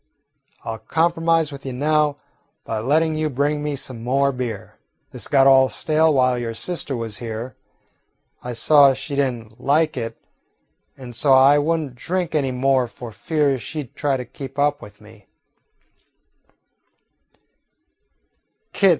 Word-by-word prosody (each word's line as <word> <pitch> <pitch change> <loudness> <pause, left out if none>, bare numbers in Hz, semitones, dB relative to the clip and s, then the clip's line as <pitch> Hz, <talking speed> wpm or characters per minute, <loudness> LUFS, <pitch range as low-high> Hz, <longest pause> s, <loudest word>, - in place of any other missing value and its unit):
I 115 - -3
'll - - -7
compromise 165 +5 +1
with 140 -1 -9
you 130 - -5
now 150 +2 +1 0.5
by 110 - -3
letting 155 +7 +1
you 155 0 -1
bring 145 +2 -1
me 150 -1 -2
some 130 -3 -6
more 140 +3 +2
beer. 120 -6 -6 0.3
This - - -5
got 135 -2 +4
all 135 -1 +6
stale 160 -1 +1
while 130 -3 +2
your 115 -1 -4
sister 145 -1 -3
was 115 -2 -5
here. 115 +2 -6 0.9
I 125 - -5
saw 140 +2 +5
she 145 - -6
did 140 -2 +2
n't 115 -2 -12
like 155 +3 +2
it, 115 -1 -4 0.8
and 125 -3 -9
so 135 +3 +3
I 135 +2 +6
would 165 +3 +1
n't 140 -5 -7
drink 175 +6 -3
any 140 -4 0
more 130 0 +1
for 120 -1 -10
fear 145 +1 0
she 150 +7 -5
'd 125 - -19
try 140 -2 0
to 125 - -6
keep 135 +2 -10
up 145 +1 +1
with 105 +1 -13
me." 105 -1 -17
135 Hz, 150 wpm, -21 LUFS, 120-150 Hz, 0.9 s, all